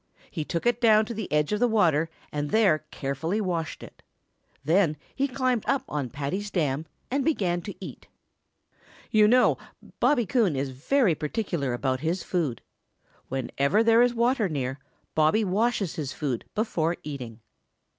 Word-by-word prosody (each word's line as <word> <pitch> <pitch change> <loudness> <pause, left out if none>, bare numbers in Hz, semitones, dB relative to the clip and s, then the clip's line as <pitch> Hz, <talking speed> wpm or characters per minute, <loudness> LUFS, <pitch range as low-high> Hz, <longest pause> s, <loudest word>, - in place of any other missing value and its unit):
He 160 - -3
took 170 +5 -3
it 240 0 +2
down 220 -2 +5
to 235 - -5
the 215 -3 -5
edge 150 +4 +1
of 210 - 0
the 245 - +4
water 165 -8 +2 0.2
and 145 0 -2
there 190 -8 +3
carefully 150 +9 -2
washed 170 -6 -3
it. - - -13 0.6
Then 160 -1 +3 0.2
he 275 +1 0
climbed 255 -3 0
up 275 +1 +1
on 145 -4 -3
Paddy's 150 - -3
dam 155 -4 -1 0.2
and 275 +1 +1
began 185 - 0
to 200 - -7
eat. - - -9 1.0
You 215 -1 +6
know 250 +3 +4 0.4
Bobby 245 -6 +3
Coon 205 - +2
is 135 0 -2
very 185 - +2
particular 150 - -2
about 130 +1 -1
his 165 +4 -1
food. 155 -10 -2 0.7
Whenever 140 - +1
there 230 +1 +5
is 245 0 +3
water 235 -3 +2
near, 135 -3 -3 0.3
Bobby 160 +8 +3
washes 205 -1 0
his 140 -4 -3
food 135 -6 -3
before 175 -6 0
eating. 125 -6 -7
175 Hz, 155 wpm, -26 LUFS, 150-225 Hz, 1.0 s, You